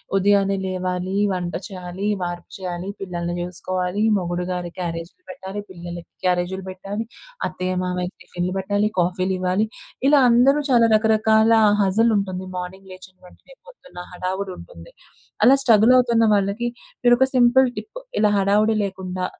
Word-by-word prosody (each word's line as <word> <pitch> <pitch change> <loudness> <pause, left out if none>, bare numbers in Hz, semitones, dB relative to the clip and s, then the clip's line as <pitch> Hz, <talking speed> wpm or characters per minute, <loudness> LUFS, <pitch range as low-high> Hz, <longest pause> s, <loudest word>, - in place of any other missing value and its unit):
ఉదయాన్నే 195 0 +3
లేవాలి, 185 0 -3 0.2
వంట 180 -1 -3
చేయాలి, 185 +1 -6
వార్పు 175 -1 -5
చేయాలి, 180 0 -5
పిల్లల్ని 175 -2 -4
చూసుకోవాలి, 180 +2 -3 0.2
మొగుడుగారి 180 0 -3
క్యారేజ్‌‌లు 170 - -5
పెట్టాలి, 205 -6 -7
పిల్లలకి 175 -1 -9
క్యారేజిలు 180 +1 0
పెట్టాలి, 195 +4 -5 0.4
అత్తయ్య 185 0 -3
మామయ్యకి 180 0 -3
టిఫిన్‌లు 180 +1 -4
పెట్టాలి, 205 +2 0
కాఫీలు 185 +2 0
ఇవ్వాలి. 185 +4 0 0.4
ఇలా 290 -1 +6
అందరూ 270 +5 +4
చాలా 230 -2 +5
రకరకాల 220 0 +3 0.3
హజిల్ 220 +4 +3
ఉంటుంది. 185 -1 -3
మార్నింగ్ 190 +2 -7
లేచిన 185 0 -15
వెంటనే - - -19
పొద్దున్న 270 - -12
హడావుడి 185 +1 -4
ఉంటుంది. - - -13 0.5
అలా 275 +2 +7
స్ట్రగల్ 230 0 +5
అవుతున్న 235 -2 +3
వాళ్ళకి 200 +5 -1 0.3
మీరొక 240 +2 +5
సింపుల్ 250 +1 +5
టిప్ 480 +4 -7 0.2
ఇలా 210 -1 +3
హడావుడి 210 +3 +2
లేకుండా, 185 -1 -4
190 Hz, 130 wpm, -22 LUFS, 180-220 Hz, 0.5 s, అలా